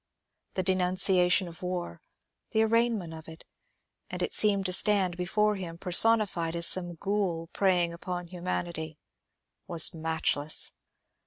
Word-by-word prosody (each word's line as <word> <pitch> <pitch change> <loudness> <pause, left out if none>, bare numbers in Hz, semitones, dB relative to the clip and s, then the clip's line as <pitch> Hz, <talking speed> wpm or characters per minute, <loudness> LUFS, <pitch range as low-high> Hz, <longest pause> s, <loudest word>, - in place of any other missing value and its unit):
The 185 - -1
denunciation 185 0 +2
of 170 0 -12
war, 180 - -5 0.5
the 220 - +3
arraignment 225 -6 0
of 160 -1 -11
it 160 0 -13 0.3
— - - -51
and - - -5
it - - -3
seemed 200 -2 +2
to 185 - +1
stand 190 -2 +3
before 210 +4 0
him 170 -3 -8
personified 180 -2 +3
as 170 0 +2
some 175 -1 +4
Ghoul 180 -3 -3
preying 180 -3 +1
upon 180 +1 -6
Humanity 170 -3 -5 0.3
— - - -55
was 170 +1 +3
matchless. 160 -2 0
180 Hz, 140 wpm, -27 LUFS, 170-195 Hz, 0.5 s, some